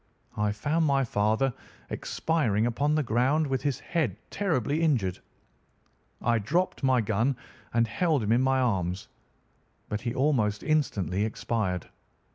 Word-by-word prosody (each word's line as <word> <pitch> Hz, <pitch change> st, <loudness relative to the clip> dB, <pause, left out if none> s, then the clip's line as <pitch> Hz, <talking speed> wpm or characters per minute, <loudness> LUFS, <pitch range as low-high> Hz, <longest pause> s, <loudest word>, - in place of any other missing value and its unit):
I 105 Hz, 0 st, +1 dB
found 150 Hz, +10 st, 0 dB
my 140 Hz, -1 st, +3 dB
father 110 Hz, +3 st, +1 dB, 0.4 s
expiring 115 Hz, -10 st, 0 dB
upon 145 Hz, +6 st, +1 dB
the 155 Hz, -, +2 dB
ground, 130 Hz, +6 st, +2 dB
with 135 Hz, -2 st, -1 dB
his 140 Hz, -3 st, -1 dB
head 135 Hz, -, -1 dB
terribly 155 Hz, -, 0 dB
injured. 120 Hz, -, +1 dB, 1.0 s
I 115 Hz, -1 st, +3 dB
dropped 170 Hz, -, 0 dB
my 130 Hz, -2 st, +3 dB
gun 110 Hz, +5 st, +1 dB, 0.4 s
and 115 Hz, 0 st, +3 dB
held 150 Hz, -, +1 dB
him 105 Hz, -, 0 dB
in 120 Hz, +2 st, +4 dB
my 130 Hz, 0 st, +2 dB
arms, 95 Hz, -7 st, -1 dB, 0.8 s
but 105 Hz, -, -2 dB
he 120 Hz, -2 st, -3 dB
almost 120 Hz, -8 st, +1 dB
instantly 105 Hz, -, 0 dB
expired. 105 Hz, -4 st, -2 dB
120 Hz, 135 wpm, -28 LUFS, 105-145 Hz, 1.0 s, in